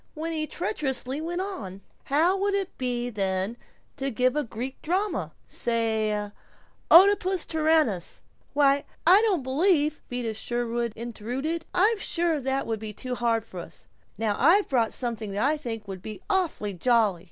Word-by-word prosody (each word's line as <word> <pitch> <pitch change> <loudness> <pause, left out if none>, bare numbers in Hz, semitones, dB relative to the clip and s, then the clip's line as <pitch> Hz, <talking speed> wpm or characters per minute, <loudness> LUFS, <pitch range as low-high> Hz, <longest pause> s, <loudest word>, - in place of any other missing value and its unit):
when 325 +2 -3
he 310 -1 -2
treacherously 280 - -2
went 345 +3 -2
on, 205 - -6 0.3
"How 325 +7 +3
would 400 +1 0
it 390 -2 -2
be 245 -1 -2
then 195 +1 -1 0.4
to 275 0 -2
give 255 +2 +1
a 300 - +1
Greek 250 +2 -6
drama 370 +3 -1
say 220 -3 -1 0.6
'Oedipus 375 0 +6
Tyrannus'?" 310 - +1 0.3
"Why, 280 0 +4 0.2
I 370 +5 +8
don't 365 -10 +1
believe 305 +2 +2
" - - -38
Vida 245 -3 -3
Sherwin 235 +1 -2
intruded, 245 +8 -4
"I'm 415 +4 +3
sure 335 -5 0
that 265 +1 -1
would 225 -1 -2
be 215 0 -6
too 255 +4 -5
hard 230 -2 0
for 185 -5 -9
us. 170 - -10 0.3
Now 215 -1 0
I've 355 +9 +5
brought 235 -4 +2
something 225 -5 -4
that 205 +5 +1
I 305 - +2
think 230 -8 -6
would 190 -2 -7
be 215 +1 -7
awfully 340 - 0
jolly." 215 -2 +2
255 Hz, 160 wpm, -26 LUFS, 225-325 Hz, 0.6 s, I